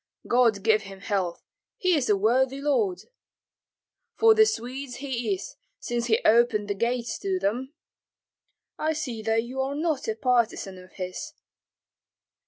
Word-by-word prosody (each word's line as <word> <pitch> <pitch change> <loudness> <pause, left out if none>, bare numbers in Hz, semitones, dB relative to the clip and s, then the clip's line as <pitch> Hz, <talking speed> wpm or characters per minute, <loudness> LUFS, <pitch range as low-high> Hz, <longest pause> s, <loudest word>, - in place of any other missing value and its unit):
"God 230 -5 +3
give 215 -1 +4
him 195 -2 -11
health, 190 -5 -2 0.3
he 365 -1 +2
is 285 -8 +1
a 205 - +4
worthy 255 +6 +2
lord!" 350 +7 +1 1.1
"For 450 0 +6
the 435 0 +6
Swedes 250 - -4
he 255 0 -3
is, 375 - -9 0.2
since 240 0 -2
he 225 -1 +3
opened 220 -2 +4
the - - +1
gates 235 +2 -2
to 190 -1 -1
them." 240 - -2 1.0
"I 315 +1 +1
see 265 -8 -4
that 225 +1 +1
you 255 +3 -4
are 270 +1 -2
not 310 -2 -1
a 220 - -1
partisan 230 -6 0
of 185 0 -16
his." 185 +12 -6
240 Hz, 150 wpm, -26 LUFS, 215-275 Hz, 1.1 s, For